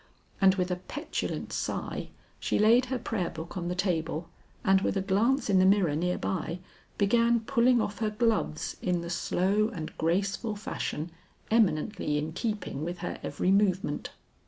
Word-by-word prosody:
And 190 0 +6
with 180 -1 -1
a 180 - 0
petulant 290 - -4
sigh - - -3 0.3
she - - 0
laid 230 +4 +5
her 260 0 -2
prayer 215 -7 -2
book 160 +3 -8
on 175 -2 -3
the 180 - -2
table 165 -3 -1 0.4
and 195 -1 +5
with 200 - 0
a - - +1
glance 225 +8 +2
in 195 -3 +4
the - - +5
mirror 190 -6 +4
near 180 +3 0
by, 170 -2 -2 0.4
began 230 +3 +3
pulling 245 0 +3
off 205 -2 -2
her 220 -2 +1
gloves 215 -7 0
in 180 -1 0
the 170 0 -5
slow 195 +4 +1
and 165 -9 -6
graceful 195 +6 0
fashion 170 -5 -4 0.4
eminently 185 -6 +2
in 155 +2 -3
keeping 210 - -3
with 175 +2 -3
her - - -4
every 185 - 0
movement. 195 -6 +1
195 Hz, 165 wpm, -29 LUFS, 175-220 Hz, 0.4 s, And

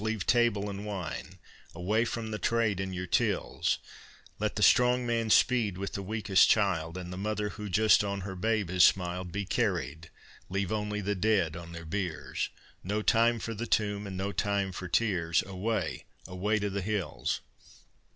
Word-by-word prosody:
leave 110 -3 -2
table 115 -4 +2
and 100 0 -5
wine, 95 -6 -5 0.4
Away 105 +7 +1
from 115 -2 -4
the 105 - -3
trade 115 -5 +1
and 95 -1 -3
your 90 0 -3
tills; 85 - 0 0.6
Let 105 0 -1
the 105 - 0
strong 125 +2 +5
man 115 -1 0
speed 110 -5 +3
with 100 0 -4
the 100 - -3
weakest 100 -1 +3
child, 90 -5 +1
And 90 -1 -6
the 90 - -6
mother 105 0 -1
who 105 0 -7
just 110 +3 +5
on 100 -1 -3
her 95 0 -6
babe 105 -1 0
has 90 -1 +5
smiled 90 -1 +2
Be 100 +2 -3
carried, 80 - -1 0.4
leave 100 +1 -1
only 105 -1 -2
the 100 +1 -1
dead 95 -5 +1
on 85 0 -8
their 85 0 -8
biers, 90 -1 -3 0.3
No 105 +3 -1
time 115 +2 +4
for 115 +1 -4
the 115 +2 -4
tomb, 105 -1 0
and 95 -1 -6
no 100 +2 -2
time 100 0 0
for 90 +1 -6
tears; 90 -4 +1
Away, 100 +4 -2 0.2
away 100 +4 -1
to 105 -1 -2
the 100 +1 -2
hills! 100 -1 -2
100 Hz, 180 wpm, -30 LUFS, 90-110 Hz, 0.6 s, strong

